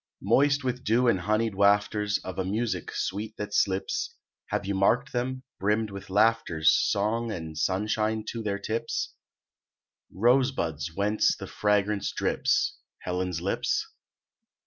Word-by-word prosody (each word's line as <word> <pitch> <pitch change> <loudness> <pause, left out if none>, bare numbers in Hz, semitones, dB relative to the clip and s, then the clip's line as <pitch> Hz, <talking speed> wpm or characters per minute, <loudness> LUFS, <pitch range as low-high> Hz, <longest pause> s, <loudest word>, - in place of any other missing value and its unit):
Moist 140 +1 +3
with 125 0 -2
dew 120 +4 +3
and 105 -6 +3
honied 110 +4 0
wafters 105 +1 +2
Of 95 0 -6
a - - +1
music 110 +5 -2
sweet 105 +3 -3
that 105 -1 -5
slips, 95 -1 0 0.3
Have - - -2
you 100 - -1
marked 115 +8 +2
them, 130 +1 -2 0.2
brimmed 105 +2 +1
with 100 -1 -8
laughter's 105 -6 +3
Song 110 +3 +1
and 80 -5 -6
sunshine 110 +5 0
to 115 - -5
their 100 -2 -1
tips, 115 +3 -3 1.0
Rose 125 +6 +3
buds 80 - -3
whence 105 +2 +2
the - - -6
fragrance 105 0 0
drips, - - 0 0.2
Helen's 90 -2 -2
lips? 95 - -1
105 Hz, 135 wpm, -27 LUFS, 95-115 Hz, 1.0 s, Moist